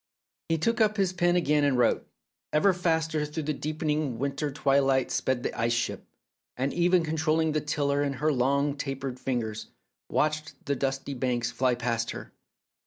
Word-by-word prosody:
He 165 - +2
took 230 +8 +1
up 215 0 +3
his 190 -2 +1
pen 175 -1 +2
again 150 -4 +2
and 140 -3 +2
wrote, 120 -2 +2 0.4
"Ever 170 +6 +4
faster 160 -3 0
through 150 +2 -4
the 150 +1 -1
deepening 150 -3 -2
winter 140 +3 -2
twilight 135 -1 +2
sped 130 -2 0
the - - -2
ice 115 +1 0
ship, 120 0 -2 0.5
and 135 +2 -1
Eva 175 +1 +3
controlling 160 0 +1
the 155 0 0
tiller 145 -1 0
in 140 -1 -1
her 150 +3 +1
long 140 +3 +1
taper 135 -2 -3
fingers, 120 -4 -3 0.4
watched 155 +1 0
the 140 - 0
dusky 135 +1 -2
banks 120 -2 -1
fly 130 -1 +1
past 115 -1 -1
her. - - -7
145 Hz, 170 wpm, -28 LUFS, 130-160 Hz, 0.5 s, Ever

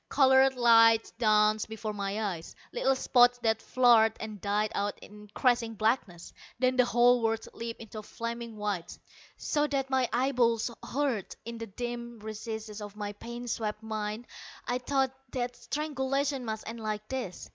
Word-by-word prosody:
Colored 265 -1 +5
lights 230 -2 +5
danced 215 -1 +3
before 220 -1 -4
my 200 +1 -2
eyes, 165 -1 -10 0.2
little 270 0 +2
spots 245 -1 +4
that 225 -1 +2
flared 235 -3 +5
and 215 -3 -7
died 210 +1 0
out 205 0 -1
in 210 0 -14
crashing 240 -3 +2
blackness. 215 -6 -1 0.2
Then 255 +1 +2
the 250 -1 +5
whole 240 +1 +4
world 225 0 0
leaped 230 0 -6
into 220 -1 -8
a - - -6
flaming 230 0 -6
white, 205 -5 -3 0.4
so 295 0 0
that 270 -2 -2
my 260 -2 +2
eyeballs 240 -2 +2
hurt. 260 -7 -2
In 235 0 -6
the 230 - -5
dim 240 +2 -5
recesses 215 0 -6
of 205 -1 -8
my 205 -1 -4
pain 235 +3 -8
swept 215 -2 -3
mind 215 +1 -4 0.4
I 245 +1 0
thought 265 +1 +1 0.2
that 245 -1 -2
strangulation 275 -1 -2
must 220 -1 -4
end 230 +1 -6
like 215 -1 -4
this. 250 -9 -5
230 Hz, 160 wpm, -29 LUFS, 215-250 Hz, 0.4 s, Colored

